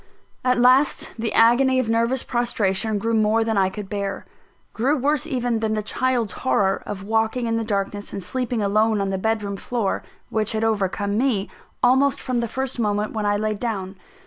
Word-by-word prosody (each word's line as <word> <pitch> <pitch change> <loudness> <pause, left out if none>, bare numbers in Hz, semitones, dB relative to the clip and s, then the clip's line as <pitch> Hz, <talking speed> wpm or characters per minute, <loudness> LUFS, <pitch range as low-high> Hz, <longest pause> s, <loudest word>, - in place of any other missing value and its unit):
At 250 -1 +2
last, 255 +4 +3
the 225 -1 0
agony 255 +3 +5
of 255 -3 +1
nervous 230 +3 +1
prostration 220 -3 0
grew 230 +3 -1
more 220 +1 +3
than 225 -1 -1
I 190 -1 +3
could 205 +1 -7
bear 200 0 -4 0.5
grew 270 +7 +1
worse 285 +1 +1
even 245 -3 -1
than 220 -1 -1
the 215 -1 -1
child's 240 -1 0
horror 190 +9 +1
of 195 -2 -5
walking 225 +3 0
in 230 0 0
the 230 - -1
darkness, 205 -1 -3
and 195 - -5
sleeping 245 +2 -2
alone 215 +2 +2
on 195 -1 -1
the 190 - -2
bed 220 +1 0
room 200 -1 -4
floor, 225 -2 -2 0.3
which 215 -1 0
had 220 0 -1
overcome 205 -1 0
me, 235 -7 0 0.3
almost 265 +3 +4
from 255 -2 -2
the 235 - -1
first 265 +2 -3
moment 210 -1 0
when 215 -2 -1
I 205 0 +2
laid 215 -1 -2
down. 200 -5 -3
220 Hz, 195 wpm, -22 LUFS, 205-245 Hz, 0.5 s, agony